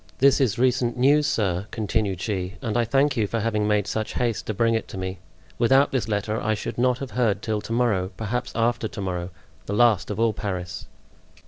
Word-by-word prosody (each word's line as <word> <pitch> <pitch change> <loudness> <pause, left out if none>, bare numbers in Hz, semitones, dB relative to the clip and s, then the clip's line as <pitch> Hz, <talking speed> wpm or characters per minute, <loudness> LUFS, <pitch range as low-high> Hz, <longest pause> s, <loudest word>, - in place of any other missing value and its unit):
This 140 +1 +4
is 125 -7 +2
recent 125 -1 +1
news, 145 +4 +4
sir," 100 -7 0
continued 105 -4 -1
she, 95 -1 -3
"and 110 -3 -3
I 120 -1 +2
thank 135 +4 +2
you 110 -4 +1
for 115 - -2
having 105 -1 0
made 105 -2 +2
such 110 +1 -3
haste 120 -3 -1
to 110 - -1
bring 115 +2 +2
it 110 - -1
to - - -8
me; 95 0 -4 0.4
without 135 +4 +4
this 130 -4 -1
letter 105 +1 -1
I 110 0 +1
should 105 - -5
not 125 0 +3
have 135 -1 -6
heard 110 -5 0
till 110 -2 -1
to 105 - -8
morrow, 115 -6 +1
perhaps 115 +2 -3
after 115 0 +1
to 105 - -9
morrow—the 90 +1 -6
last 105 -5 +3
of 105 0 -4
all 115 -1 +3
Paris." 90 -3 -5
110 Hz, 210 wpm, -24 LUFS, 100-120 Hz, 0.4 s, This